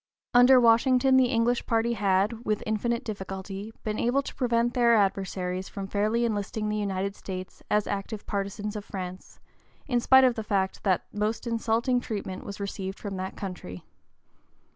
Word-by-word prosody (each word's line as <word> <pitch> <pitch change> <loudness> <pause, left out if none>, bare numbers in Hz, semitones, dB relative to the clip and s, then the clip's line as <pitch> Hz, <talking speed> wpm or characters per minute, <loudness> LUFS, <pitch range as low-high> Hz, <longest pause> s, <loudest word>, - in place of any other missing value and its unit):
Under 250 +1 +7
Washington 250 +3 +4
the 260 -1 +5
English 235 +1 +1
party 230 +1 +1
had, 205 +2 +1
with 215 -3 -1
infinite 235 +3 -1
difficulty, 195 0 -6
been 215 0 -2
able 255 +4 +2
to - - -7
prevent 240 -1 +1
their 235 -2 +4
adversaries 190 -2 -1
from 200 -1 -5
fairly 215 +4 +1
enlisting 210 -1 -2
the 210 - -1
United 200 -1 -2
States 185 -1 -7
as 210 0 +2
active 200 +1 -4
partisans 205 +1 -3
of 210 - -4
France, 185 -2 -8 0.5
in 245 -2 +1
spite 265 +2 +6
of 255 -2 +5
the 220 - -4
fact 190 -2 -1
that 190 -3 +1
most 210 +3 -1
insulting 235 +2 +1
treatment 200 -5 -5
was 200 0 -7
received 195 -1 -4
from 200 -2 -6
that 185 +1 -5
country. 180 - -7
210 Hz, 165 wpm, -27 LUFS, 195-235 Hz, 0.5 s, Under